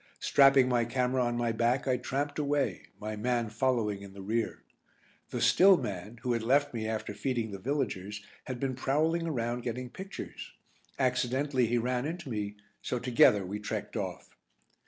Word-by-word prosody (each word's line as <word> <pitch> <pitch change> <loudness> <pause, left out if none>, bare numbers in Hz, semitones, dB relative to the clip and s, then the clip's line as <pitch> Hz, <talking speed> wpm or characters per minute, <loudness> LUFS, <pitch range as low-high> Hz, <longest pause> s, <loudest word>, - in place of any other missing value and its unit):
Strapping 135 -2 +6
my 120 -2 +2
camera 125 +2 +1
on 120 0 0
my 120 -1 +1
back 120 +4 +1
I 130 - +3
tramped 145 +4 -2
away, 145 -1 0
my 110 0 -4
man 120 +1 0
following 115 -4 0
in 100 -1 -10
the 100 - -9
rear. 110 +3 -2 0.7
The - - -3
"still" 190 0 +6
man, 100 - -5
who 125 -2 +1
had 115 - 0
left 140 +5 +2
me 110 -2 -3
after 110 -1 -3
feeding 120 -5 -2
the 100 - -6
villagers, 105 -5 -3 0.2
had 130 -2 -5
been 135 0 -1
prowling 160 +6 +1
around 120 -4 -1
getting 125 +1 -4
pictures. 195 +1 -8 0.4
Accidentally 130 0 +1
he 120 +2 +1
ran 125 +3 0
into 170 -2 -5
me, 105 -2 -3 0.3
so 125 - -2
together 120 -5 +4
we 100 +3 -4
trekked 105 - -4
off. - - -4
125 Hz, 170 wpm, -30 LUFS, 110-135 Hz, 0.7 s, Strapping